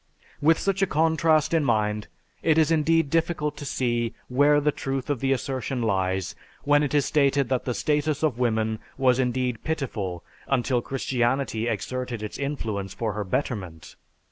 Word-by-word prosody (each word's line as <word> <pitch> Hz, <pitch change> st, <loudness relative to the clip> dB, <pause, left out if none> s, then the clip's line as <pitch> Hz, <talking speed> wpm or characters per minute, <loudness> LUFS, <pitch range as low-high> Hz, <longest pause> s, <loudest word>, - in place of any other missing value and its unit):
With 160 Hz, +2 st, +5 dB
such 195 Hz, 0 st, -1 dB
a 195 Hz, -, +3 dB
contrast 160 Hz, -1 st, +2 dB
in 160 Hz, -2 st, +3 dB
mind, 105 Hz, -4 st, 0 dB, 0.3 s
it 160 Hz, -1 st, +3 dB
is 160 Hz, 0 st, +4 dB
indeed 165 Hz, -1 st, +2 dB
difficult 165 Hz, -3 st, 0 dB
to 145 Hz, -, -6 dB
see 120 Hz, -3 st, -1 dB
where 145 Hz, +3 st, +4 dB
the 150 Hz, +1 st, +2 dB
truth 135 Hz, 0 st, -3 dB
of 140 Hz, -, -1 dB
the 135 Hz, +1 st, 0 dB
assertion 130 Hz, -1 st, -2 dB
lies 95 Hz, -3 st, 0 dB, 0.3 s
when 145 Hz, 0 st, +4 dB
it 145 Hz, -1 st, -1 dB
is 145 Hz, -2 st, +3 dB
stated 140 Hz, -3 st, +2 dB
that 130 Hz, -2 st, 0 dB
the 125 Hz, -, -1 dB
status 150 Hz, 0 st, 0 dB
of 135 Hz, -6 st, +1 dB
woman 110 Hz, -2 st, 0 dB, 0.2 s
was 130 Hz, -1 st, +3 dB
indeed 125 Hz, -2 st, -1 dB
pitiful 110 Hz, -, -3 dB, 0.2 s
until 125 Hz, -2 st, +1 dB
Christianity 125 Hz, -2 st, -1 dB
exerted 125 Hz, -2 st, -3 dB
its 105 Hz, -, -6 dB
influence 110 Hz, -9 st, -3 dB
for 110 Hz, -3 st, -2 dB
her 105 Hz, 0 st, -3 dB
betterment. 95 Hz, -, -4 dB
130 Hz, 165 wpm, -25 LUFS, 115-150 Hz, 0.3 s, With